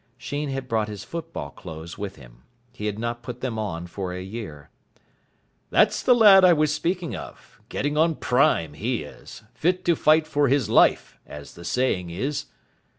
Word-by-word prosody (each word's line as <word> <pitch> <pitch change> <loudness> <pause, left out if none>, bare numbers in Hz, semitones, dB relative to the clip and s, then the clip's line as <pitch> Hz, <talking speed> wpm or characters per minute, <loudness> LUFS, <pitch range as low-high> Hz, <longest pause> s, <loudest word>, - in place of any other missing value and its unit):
Sheen 145 +4 -4
had 135 -1 -4
brought 110 -3 0
his 105 -2 -7
football 165 - -6
clothes 80 +4 -9
with 100 -1 -6
him. - - -16 0.3
He 105 -4 -4
had 105 -1 -3
not 120 +1 -3
put 125 +1 -8
them 120 -4 -3
on 85 -5 -4
for 90 +1 -5
a 90 +1 -5
year. 95 -9 -8 1.0
"That's - - +3
the 250 - +5
lad 205 -5 +8
I 180 -1 +7
was 150 -1 +2
speaking 170 +2 -2
of. - - -11
Getting 145 +2 -2
on 160 +1 +3
prime, 105 - +2
he 115 +5 -2
is. 75 - -12
Fit 180 +9 0
to 170 - +3
fight 155 +1 +4
for 145 -2 +1
his 135 -3 +1
life, - - +3
as 75 -1 -10
the 85 - -12
saying 90 -5 0
is." 130 +12 -3
120 Hz, 180 wpm, -24 LUFS, 90-150 Hz, 1.0 s, lad